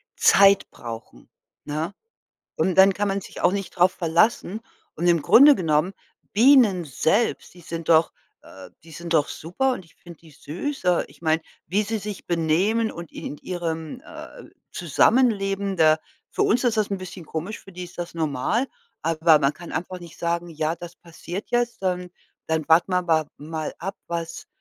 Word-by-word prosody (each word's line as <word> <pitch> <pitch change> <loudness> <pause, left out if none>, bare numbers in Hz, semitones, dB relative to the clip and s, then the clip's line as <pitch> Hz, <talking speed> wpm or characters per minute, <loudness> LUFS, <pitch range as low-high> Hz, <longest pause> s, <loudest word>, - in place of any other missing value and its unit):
Zeit 200 0 +5
brauchen, 115 -1 -10 0.4
ne? 155 +6 -3 0.6
Und 185 - +1
dann 190 0 +7
kann 205 +1 -1
man 195 0 -1
sich - - -10
auch - - +4
nicht 195 -1 -3
drauf 180 +1 +3
verlassen. 190 +5 +1 0.3
Und 175 +3 -1
im 170 -3 +4
Grunde 280 - +7
genommen, 165 +2 +1 0.4
Bienen 220 - +5
selbst, 165 - 0
die 180 - -16
sind 165 0 -6
doch, 160 0 +4 0.3
äh, 95 -1 -13 0.2
die 165 - -14
sind 170 +2 -6
doch 150 -3 +3
super 255 - -1
und 190 - -7
ich 165 - -24
finde 170 -3 -14
die 160 -2 -18
süß. 185 - -6
Äh, 180 -1 +3
ich - - -20
meine, 160 0 +1 0.3
wie 200 +6 +1
sie 220 +1 -2
sich 210 -1 -7
benehmen 180 +7 +1
und 170 -2 -9
in - - -9
in 145 - -5
d - - -25
ihrem, 165 -3 -4
äh, - - -11 0.3
Zusammenleben 195 - +1
da 155 -1 +5 0.3
für - - -2
uns 240 +4 +2
ist 235 -2 +2
das 210 -1 +1
'n 195 - -1
bisschen 185 -2 -9
komisch, 170 +8 -5
für 195 - -15
die 180 0 -7
ist 175 - -15
das 175 -1 -5
normal, 160 - -1 0.3
aber 160 -1 +4
man 140 +1 +1
kann 170 +2 -11
einfach 180 +2 -4
nicht 170 -1 -12
sagen: 170 0 -2
„Ja, 160 +1 -2
das 175 +1 -10
passiert 175 +3 -8
jetzt, 240 -3 -1
dann 180 -1 -2 0.4
dann 160 -2 -1
warten 170 +3 +4
wir 180 -1 0
wa 160 -2 +3
mal 155 +1 -5
ab, 195 +1 -5
was 170 -1 -5
175 Hz, 185 wpm, -24 LUFS, 160-195 Hz, 0.6 s, dann